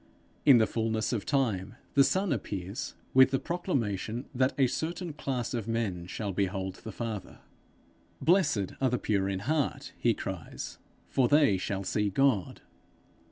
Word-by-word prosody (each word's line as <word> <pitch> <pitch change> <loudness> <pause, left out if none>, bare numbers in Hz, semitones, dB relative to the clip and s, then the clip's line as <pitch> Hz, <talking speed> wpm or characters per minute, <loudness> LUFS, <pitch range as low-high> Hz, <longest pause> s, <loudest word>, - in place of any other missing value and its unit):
In 135 -4 +9
the 110 - +5
fullness 110 +1 -1
of 115 +1 -2
time 120 -9 0 0.2
the 140 - +6
Son 185 +8 +1
appears 100 +7 -4 0.2
with 130 0 +7
the 135 - +1
proclamation 125 - -2
that 130 +1 +2
a 135 - +5
certain 165 +5 -3
class 135 -5 -3
of 115 -3 -3
men 105 -7 -2
shall 100 +1 -4
behold 95 0 -2
the 110 - -8
Father: 110 -4 -5 0.8
'Blessed 155 - +3
are 130 - +3
the 125 - +1
pure 100 -4 0
in 95 -1 -2
heart,' 135 +1 -1
he 115 -2 +3
cries, 95 -5 -6 0.3
'for 130 -2 +2
they 145 -8 +5
shall 95 +1 -3
see 105 +2 0
God.' 110 -2 +1
115 Hz, 155 wpm, -29 LUFS, 100-135 Hz, 0.8 s, In